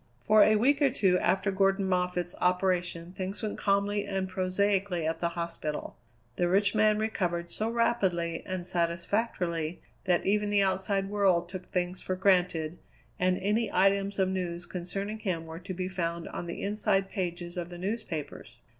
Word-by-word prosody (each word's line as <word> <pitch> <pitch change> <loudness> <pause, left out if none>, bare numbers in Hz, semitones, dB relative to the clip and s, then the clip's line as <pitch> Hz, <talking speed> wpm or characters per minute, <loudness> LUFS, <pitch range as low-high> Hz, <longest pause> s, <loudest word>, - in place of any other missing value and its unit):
For 215 0 +6
a 215 - +6
week 280 +7 +3
or 280 - +5
two 190 -8 +2
after 195 +1 +1
Gordon 195 0 +2
Moffatt's 180 -1 0
operation 180 -2 +1
things 190 +3 -5
went 215 - -3
calmly 200 0 +1
and 190 -1 -1
prosaically 185 -1 0
at 160 +1 -1
the 170 0 -2
hospital. 170 -3 -4 0.4
The 175 - +2
rich 200 +2 +3
man 215 -1 +4
recovered 175 -6 -1
so 220 +1 -1
rapidly 190 -8 +1
and 185 -2 -3
satisfactorily 170 -1 -1 0.3
that 180 -2 +2
even 210 +1 +2
the 205 -1 +4
outside 195 +1 0
world 190 -4 +2
took 185 -1 -7
things 180 0 -1
for 185 - -2
granted, 180 -4 +2 0.4
and 185 0 +2
any 210 +4 0
items 195 0 +2
of 190 -1 +2
news 175 -2 -3
concerning 195 +5 -4
him 175 -6 -2
were 160 0 -8
to 185 +2 -7
be 185 +1 -2
found 170 -2 -3
on 175 - -5
the 170 - -5
inside 200 -1 +1
pages 175 -3 -4
of 175 -1 -4
the 175 - -8
newspapers. 175 - -5
185 Hz, 165 wpm, -29 LUFS, 175-200 Hz, 0.4 s, For